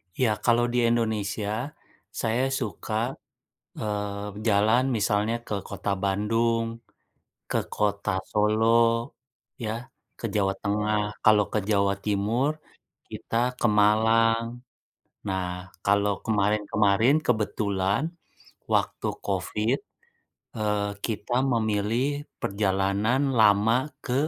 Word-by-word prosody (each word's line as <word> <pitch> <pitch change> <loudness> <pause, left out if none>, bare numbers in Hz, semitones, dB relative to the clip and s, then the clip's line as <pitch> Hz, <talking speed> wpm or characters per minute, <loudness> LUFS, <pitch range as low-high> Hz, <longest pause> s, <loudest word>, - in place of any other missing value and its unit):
Ya 125 -4 +2 0.2
kalau 120 0 +4
di - - +1
Indonesia, 110 +2 -1 0.5
saya 115 +3 +1 0.2
suka, 110 -2 -5 0.9
eee, 105 -1 -4
jalan 110 +5 +4
misalnya 105 +1 +1
ke 105 - -3
Kota - - -4
Bandung, 115 +4 +1 0.9
ke - - +1
Kota 100 -1 0 0.2
Solo 105 +1 +2 1.0
ya, 110 -1 -2 0.5
ke 115 - -3
Jawa 95 -2 +2
Tengah, 105 +1 0 0.3
kalau 105 -1 +6
ke - - +1
Jawa 100 -1 +3
Timur 105 +7 +1 0.6
kita - - -6 0.2
ke - - 0
Malang. 115 +2 +4 0.8
Nah, 95 -1 -1 0.4
kalau 100 0 +3
kemarin-kemarin 105 +2 +2
kebetulan 100 -2 0 0.7
waktu - - 0 0.2
covid, - - 0 0.8
eee, 105 -1 0 0.2
kita 110 0 -3 0.2
memilih 110 +1 +1 0.4
perjalanan 100 +4 +1 0.2
lama 105 +1 +5 0.3
ke 125 - -2
105 Hz, 95 wpm, -26 LUFS, 100-115 Hz, 1.0 s, kalau